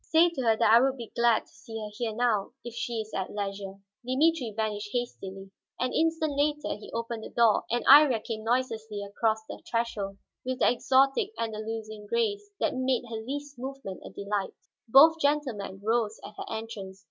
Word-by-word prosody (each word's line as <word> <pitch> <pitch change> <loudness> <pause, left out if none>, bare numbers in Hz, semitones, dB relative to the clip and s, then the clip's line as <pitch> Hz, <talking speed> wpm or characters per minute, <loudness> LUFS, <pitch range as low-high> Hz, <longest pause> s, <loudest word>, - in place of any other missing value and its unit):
"Say 330 +2 +4
to 295 -6 -4
her 225 -3 +3
that 220 - +4
I 235 - +8
would 270 0 +1
be 235 -3 -8
glad 235 -1 +4
to - - -25
see 225 -1 -9
her 210 -1 -6
here, 225 -1 -3
now, 230 -3 +1
if 240 - -7
she 235 -1 -2
is 215 0 -11
at 190 - -2
leisure." 195 -1 -4 0.3
Dimitri 265 +1 +2
vanished 210 -1 -2
hastily. 195 -6 -4 0.3
An 255 0 -1
instant 320 -2 +1
later 295 -1 0
he 210 - -11
opened 230 -1 -4
the - - -7
door, 230 -3 +3
and 240 +1 -1
Iría 275 -6 +7
came 220 -2 -5
noiselessly 225 -3 -1
across 220 +2 -1
the - - -9
threshold 215 -4 -2 0.3
with 255 0 -2
the 250 - +4
exotic, 270 - +2
Andalusian 220 -1 -5
grace 205 -3 -1
that - - +1
made 255 -1 +1
her 225 - -3
least 285 +2 -6
movement 265 -7 -6
a - - -8
delight. 200 -1 -3 0.3
Both 310 +7 +7
gentlemen 255 -10 0
rose 225 -1 0
at 210 - -9
her - - -6
entrance. 220 -4 -6
230 Hz, 185 wpm, -28 LUFS, 210-260 Hz, 0.3 s, I